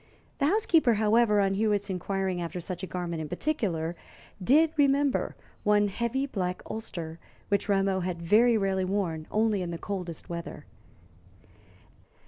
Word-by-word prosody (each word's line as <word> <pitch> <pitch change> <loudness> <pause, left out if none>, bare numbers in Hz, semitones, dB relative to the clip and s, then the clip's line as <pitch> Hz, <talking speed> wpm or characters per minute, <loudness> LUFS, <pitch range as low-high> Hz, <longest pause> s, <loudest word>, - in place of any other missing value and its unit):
The 280 - +3
housekeeper, 325 - +3
however, 215 0 +3
on 195 -1 +2
Hewitt's 205 0 +1
inquiring 190 -1 -2
after 170 +1 -4
such 175 +1 -5
a 190 - -4
garment 170 -2 -4
in 155 - -5
particular, 180 - -1 0.5
did 305 - +5
remember 280 -1 +2 0.3
one 205 0 +3
heavy 235 +6 -1
black 185 -9 -3
ulster, 170 -7 -5 0.3
which 200 +1 0
Rameau 195 -1 +2
had 180 -1 -3
very 220 +7 +4
rarely 195 -2 0
worn 185 -5 -2
only 215 -2 +1
in 175 - -3
the 170 - -4
coldest 180 -4 -5
weather. 170 -1 -6
195 Hz, 140 wpm, -28 LUFS, 180-225 Hz, 0.5 s, did